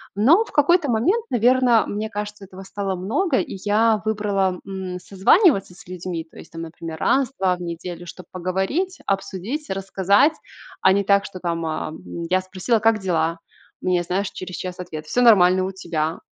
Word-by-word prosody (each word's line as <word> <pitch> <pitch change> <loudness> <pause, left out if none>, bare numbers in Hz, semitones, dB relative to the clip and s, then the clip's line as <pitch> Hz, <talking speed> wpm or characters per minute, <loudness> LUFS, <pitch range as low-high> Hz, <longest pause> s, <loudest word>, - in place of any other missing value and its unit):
Но 315 - +5
в - - -14
какой-то 295 0 +3
момент, 370 - +1
наверно, 245 -1 +4
мне 215 +1 -3
кажется, 210 -1 -6
этого 190 0 -12
стало 195 0 -3
много, 260 - 0
и - - -4
я 215 0 +3
выбрала, 200 -4 0
м, 190 -2 -5
созваниваться 195 - +3
с 175 - -16
людьми, 180 -2 -5
то - - -18
есть - - -12
там, 165 0 -7
например, 160 -1 -8
раз, 270 -1 +2
2 185 -1 +2
в 180 - -12
неделю, 175 0 -6
чтобы 185 - -10
поговорить, 190 - -2
обсудить, 200 - -3
рассказать, 195 - +2 0.5
а 190 - +5
не 200 0 +1
так, 200 0 +3
что, 185 -2 -8
там, 170 -2 -2
ам, 155 0 -4 0.3
я 185 0 +2
спросила: 185 +5 -1
"Как 225 0 +3
дела?"- 165 -3 0 0.4
мне, 180 -1 +1
знаешь, 190 +3 -1
через 185 -1 -7
час 180 0 -6
ответ: 155 -4 -7
"Всё 245 - +1
нормально. 185 -4 +6
У 190 - -3
тебя?"- 165 -3 -3
190 Hz, 175 wpm, -22 LUFS, 180-220 Hz, 0.5 s, нормально